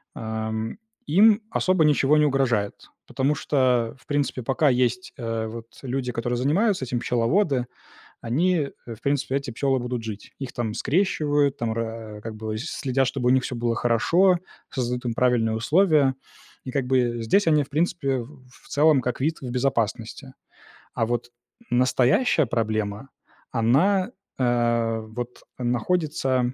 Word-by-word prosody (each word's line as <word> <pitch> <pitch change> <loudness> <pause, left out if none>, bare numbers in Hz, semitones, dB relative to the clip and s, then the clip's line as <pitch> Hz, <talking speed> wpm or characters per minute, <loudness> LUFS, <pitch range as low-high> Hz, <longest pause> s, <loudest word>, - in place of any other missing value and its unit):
ам, 110 - -4 0.3
им 210 +7 +5
особо 185 -3 +2
ничего 150 0 +4
не 150 - +4
угрожает, 125 -8 +1 0.3
потому 135 +3 0
что, 125 -5 +1
в - - -24
принципе, 145 -3 -1
пока 140 +5 +2
есть, 130 +8 0
э, 115 -2 -3
вот, 115 +1 -8 0.2
люди, 130 -1 -2
которые 120 +1 -2
занимаются 160 - +1
этим, 120 -1 -2
пчеловоды, 125 - +1 0.6
они, 150 +4 +1 0.2
э, 115 - -6
в 110 - -18
принципе, 140 -1 0
эти 140 -2 -3
пчёлы 135 +2 +1
будут 125 -1 -3
жить. 110 -2 -8
Их 135 -3 -5
там 115 -3 -2
скрещивают, 145 -5 +1
там, 115 -1 -1
ра 115 -2 -5
как 110 -1 -6
бы, 110 0 -4
следят, 135 -1 -1
чтобы 125 -1 -1
у - - +5
них 130 0 +3
всё - - -4
было 120 0 0
хорошо, 170 - +3 0.3
создают 125 -1 -2
им 120 - 0
правильные 115 -3 +2
условия. 150 - +3 0.5
И 130 - -5
как 135 -3 -1
бы 120 -3 +1
здесь 200 - +2
они, 150 -2 +4
в 140 - -8
принципе, 145 -3 0
в 130 +2 -12
в 130 - -20
целом 150 -1 +4
как 125 0 -3
вид 155 +4 0
в 125 - -5
безопасности. 125 0 -2 0.6
А 115 - 0
вот 120 +1 -3 0.4
настоящая 130 - +3
проблема, 110 +1 -2 0.4
она, 150 - +2 0.3
э, 120 -2 +1
вот 120 +2 -7 0.2
находится 130 0 0
125 Hz, 150 wpm, -24 LUFS, 115-145 Hz, 0.6 s, им